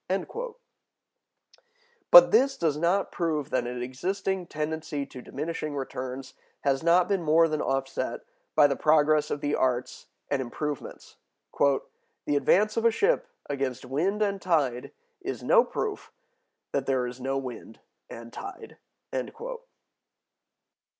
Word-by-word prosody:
(182) 445 Hz, -, -3 dB, 1.5 s
But -, -, +10 dB
this 275 Hz, -10 st, +4 dB
does 160 Hz, -4 st, +1 dB
not 175 Hz, +5 st, +1 dB
prove 155 Hz, -4 st, -2 dB
that 125 Hz, -2 st, 0 dB
an 125 Hz, 0 st, -4 dB
existing 185 Hz, +8 st, -2 dB
tendency 155 Hz, -2 st, -3 dB
to 130 Hz, -2 st, -10 dB
diminishing 155 Hz, +2 st, -4 dB
returns 130 Hz, -1 st, -5 dB, 0.3 s
has 135 Hz, -1 st, +1 dB
not 170 Hz, +2 st, +4 dB
been 195 Hz, -3 st, +1 dB
more 165 Hz, +1 st, +4 dB
than 155 Hz, -1 st, -1 dB
offset 135 Hz, -2 st, -2 dB, 0.3 s
by 150 Hz, -, +7 dB
the 140 Hz, -1 st, +3 dB
progress 150 Hz, 0 st, +3 dB
of 145 Hz, -, -3 dB
the 145 Hz, 0 st, -1 dB
arts 125 Hz, -1 st, -1 dB, 0.2 s
and 140 Hz, -2 st, +1 dB
improvements. 145 Hz, +3 st, -6 dB, 0.4 s
"The 140 Hz, +1 st, -1 dB
advance 210 Hz, +9 st, +3 dB
of 230 Hz, -, +1 dB
a -, -, +8 dB
ship 485 Hz, -, +1 dB, 0.2 s
against 135 Hz, -3 st, -3 dB
wind 180 Hz, +11 st, 0 dB
and 200 Hz, -2 st, -1 dB
tide 140 Hz, -10 st, 0 dB, 0.3 s
is 390 Hz, +2 st, -5 dB
[no] -, -, +6 dB
proof 430 Hz, -2 st, -4 dB, 0.6 s
that 140 Hz, -1 st, -1 dB
there 130 Hz, -2 st, +1 dB
is 125 Hz, +1 st, -7 dB
no 135 Hz, +1 st, -1 dB
wind 125 Hz, -4 st, -7 dB, 0.3 s
and 115 Hz, 0 st, -10 dB
tide." 395 Hz, -2 st, -9 dB
150 Hz, 130 wpm, -27 LUFS, 135-190 Hz, 1.5 s, But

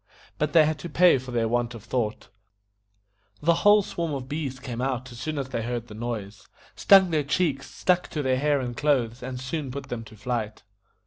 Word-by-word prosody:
But 150 Hz, -1 st, 0 dB
they 160 Hz, -2 st, +7 dB
had 155 Hz, 0 st, -1 dB
to 175 Hz, -, -6 dB
pay 180 Hz, -6 st, +5 dB
for 130 Hz, 0 st, -10 dB
their 115 Hz, -2 st, 0 dB
want 120 Hz, +1 st, -1 dB
of 110 Hz, -, -10 dB
thought; 110 Hz, -1 st, -3 dB, 1.1 s
the 170 Hz, +3 st, +3 dB
whole 205 Hz, 0 st, +6 dB
swarm 165 Hz, -5 st, -3 dB
of 130 Hz, -2 st, -6 dB
bees 140 Hz, -3 st, -4 dB
came 125 Hz, -2 st, -5 dB
out 130 Hz, -1 st, -2 dB
as 120 Hz, -, -10 dB
soon 155 Hz, +3 st, -3 dB
as 135 Hz, -2 st, -3 dB
they 115 Hz, -, -2 dB
heard 120 Hz, 0 st, -4 dB
the -, -, -9 dB
noise, 110 Hz, -3 st, -6 dB, 0.3 s
stung 190 Hz, -3 st, +6 dB
their 155 Hz, -2 st, +2 dB
cheeks, 145 Hz, -2 st, -1 dB
stuck 180 Hz, -1 st, +1 dB
to 150 Hz, -, -3 dB
their 130 Hz, -1 st, +1 dB
hair 145 Hz, 0 st, +2 dB
and 120 Hz, -2 st, -4 dB
clothes, 125 Hz, -4 st, +1 dB
and 125 Hz, 0 st, -5 dB
soon 135 Hz, +2 st, -4 dB
put 140 Hz, +1 st, -7 dB
them 120 Hz, -2 st, -4 dB
to 110 Hz, -, -13 dB
flight. 110 Hz, -2 st, -3 dB
130 Hz, 210 wpm, -26 LUFS, 120-150 Hz, 1.1 s, they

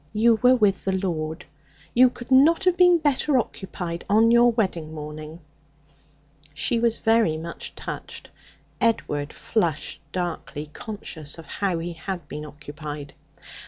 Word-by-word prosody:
You 225 Hz, +1 st, +4 dB
were 255 Hz, 0 st, +6 dB
with 210 Hz, -5 st, +2 dB
the 195 Hz, -, 0 dB
Lord. 160 Hz, -3 st, -3 dB, 0.5 s
You 250 Hz, +1 st, +6 dB
could 245 Hz, +1 st, -11 dB
not 300 Hz, +8 st, +6 dB
have 365 Hz, -1 st, +3 dB
been 355 Hz, -1 st, +6 dB
better 290 Hz, -2 st, +2 dB
occupied 180 Hz, -6 st, -4 dB
on 220 Hz, +3 st, +5 dB
your 240 Hz, 0 st, +6 dB
wedding 175 Hz, -8 st, -2 dB
morning!' 155 Hz, +2 st, -8 dB, 1.1 s
She 230 Hz, +9 st, +1 dB
was 235 Hz, -1 st, +2 dB
very 225 Hz, -8 st, +3 dB
much 170 Hz, +1 st, -7 dB
touched. -, -, -7 dB, 0.5 s
Edward 150 Hz, -10 st, 0 dB
flushed 170 Hz, -9 st, -2 dB
darkly, 165 Hz, -4 st, -4 dB
conscious 165 Hz, -9 st, -6 dB
of 165 Hz, -, -10 dB
how 185 Hz, +3 st, -1 dB
he 170 Hz, +1 st, -4 dB
had 170 Hz, -1 st, -6 dB
been 150 Hz, +1 st, -6 dB
occupied. 150 Hz, -1 st, -8 dB
185 Hz, 135 wpm, -24 LUFS, 155-235 Hz, 1.1 s, were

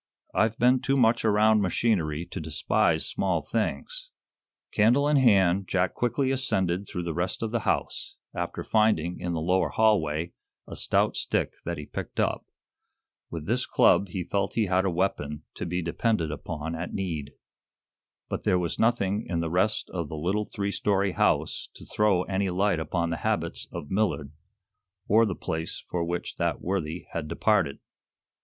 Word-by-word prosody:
"I've 110 Hz, +1 st, +2 dB
been 125 Hz, +1 st, +4 dB
too 135 Hz, 0 st, +1 dB
much 115 Hz, -2 st, +3 dB
around 110 Hz, 0 st, +4 dB
machinery 85 Hz, -5 st, 0 dB
to -, -, -4 dB
despise -, -, +1 dB
small -, -, 0 dB
things." -, -, -3 dB, 0.6 s
Candle 120 Hz, +7 st, +4 dB
in 150 Hz, -1 st, +4 dB
hand, 100 Hz, -7 st, +4 dB
Jack 90 Hz, -1 st, +1 dB
quickly 125 Hz, +3 st, 0 dB
ascended 95 Hz, -8 st, 0 dB
through 90 Hz, -, -4 dB
the 85 Hz, -1 st, -3 dB
rest 90 Hz, +6 st, -1 dB
of 110 Hz, -, -2 dB
the 120 Hz, -, +1 dB
house, -, -, -2 dB, 0.2 s
after -, -, -4 dB
finding, 100 Hz, -6 st, +2 dB
in 90 Hz, -1 st, -2 dB
the 80 Hz, -, -1 dB
lower 90 Hz, +4 st, +2 dB
hallway, 85 Hz, -7 st, +2 dB, 0.3 s
a -, -, -7 dB
stout -, -, +2 dB
stick -, -, 0 dB
that 85 Hz, 0 st, -3 dB
he 75 Hz, -, -6 dB
picked -, -, -6 dB
up. -, -, 0 dB, 0.8 s
With -, -, -6 dB
this -, -, 0 dB
club 100 Hz, -, +4 dB
he 90 Hz, 0 st, -4 dB
felt 100 Hz, +3 st, -1 dB
he 115 Hz, -, +2 dB
had 95 Hz, 0 st, +2 dB
a -, -, +2 dB
weapon 85 Hz, -5 st, -1 dB
to -, -, -5 dB
be 90 Hz, +1 st, -2 dB
depended 85 Hz, -1 st, 0 dB
upon 80 Hz, +2 st, -5 dB
at 85 Hz, +2 st, -5 dB
need. 80 Hz, -7 st, -3 dB, 0.9 s
But -, -, -4 dB
there 90 Hz, -, +3 dB
was 85 Hz, -2 st, -2 dB
nothing 110 Hz, -2 st, +1 dB
in 85 Hz, -1 st, -1 dB
the 85 Hz, -1 st, -2 dB
rest 95 Hz, +5 st, +1 dB
of 85 Hz, -5 st, -3 dB
the 80 Hz, -, -5 dB
little 95 Hz, +7 st, 0 dB
three 100 Hz, 0 st, -3 dB
story 100 Hz, -1 st, +1 dB
house -, -, 0 dB
to -, -, -12 dB
throw 105 Hz, -4 st, +2 dB
any 95 Hz, 0 st, -1 dB
light 95 Hz, 0 st, +1 dB
upon 85 Hz, +1 st, -1 dB
the 85 Hz, -, -1 dB
habits -, -, -2 dB
of 70 Hz, -, -7 dB
Millard, 95 Hz, -8 st, 0 dB, 0.8 s
or 110 Hz, +2 st, +5 dB
the 95 Hz, -, -2 dB
place 80 Hz, 0 st, -4 dB
for 85 Hz, -1 st, 0 dB
which 85 Hz, +1 st, -3 dB
that -, -, 0 dB
worthy 90 Hz, -2 st, -3 dB
had 80 Hz, -2 st, -3 dB
departed. 85 Hz, -4 st, +1 dB
95 Hz, 170 wpm, -27 LUFS, 85-110 Hz, 0.9 s, or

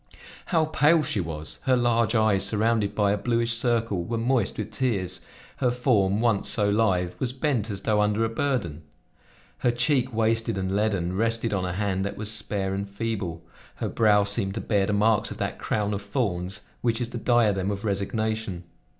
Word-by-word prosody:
How 165 Hz, -3 st, +2 dB
pale 155 Hz, +1 st, +3 dB
she 135 Hz, -6 st, -2 dB
was! 80 Hz, -3 st, -5 dB
Her 130 Hz, -2 st, +4 dB
large 120 Hz, -2 st, +2 dB
eyes, 110 Hz, -3 st, +3 dB
surrounded 105 Hz, 0 st, +1 dB
by 100 Hz, -2 st, +2 dB
a 105 Hz, -, 0 dB
bluish 115 Hz, 0 st, 0 dB
circle, 115 Hz, -6 st, 0 dB
were 115 Hz, +6 st, -3 dB
moist 120 Hz, -2 st, 0 dB
with 110 Hz, 0 st, -4 dB
tears; 100 Hz, -7 st, -1 dB, 0.4 s
her 125 Hz, -, +2 dB
form, 110 Hz, -5 st, +2 dB
once 115 Hz, -4 st, +2 dB
so 105 Hz, -4 st, +2 dB
lithe, 95 Hz, -5 st, +1 dB
was 125 Hz, -1 st, -2 dB
bent 130 Hz, -5 st, -1 dB
as 100 Hz, -2 st, -4 dB
though 105 Hz, -2 st, +2 dB
under 105 Hz, +2 st, +1 dB
a -, -, -1 dB
burden; 115 Hz, -, -2 dB, 0.8 s
her -, -, +2 dB
cheek, 125 Hz, +1 st, +1 dB
wasted 115 Hz, -1 st, 0 dB
and 95 Hz, 0 st, -2 dB
leaden, 100 Hz, -4 st, 0 dB
rested 115 Hz, +1 st, 0 dB
on 95 Hz, -2 st, 0 dB
a 90 Hz, -, -3 dB
hand 95 Hz, 0 st, -1 dB
that 100 Hz, -, -4 dB
was 105 Hz, 0 st, -1 dB
spare 100 Hz, -3 st, -1 dB
and 100 Hz, +1 st, -3 dB
feeble; 100 Hz, -6 st, -4 dB, 0.3 s
her -, -, -3 dB
brow 105 Hz, -2 st, +4 dB
seemed 100 Hz, -1 st, 0 dB
to -, -, -2 dB
bear 100 Hz, -2 st, +1 dB
the 105 Hz, -, 0 dB
marks 105 Hz, +1 st, +2 dB
of -, -, -7 dB
that -, -, -3 dB
crown 105 Hz, -1 st, -1 dB
of 100 Hz, -, -3 dB
thorns 100 Hz, -2 st, -2 dB, 0.2 s
which 115 Hz, -1 st, 0 dB
is 120 Hz, -1 st, -3 dB
the 120 Hz, -, -5 dB
diadem 105 Hz, -5 st, +2 dB
of 100 Hz, +1 st, -4 dB
resignation. 110 Hz, -2 st, -2 dB
110 Hz, 190 wpm, -25 LUFS, 100-115 Hz, 0.8 s, Her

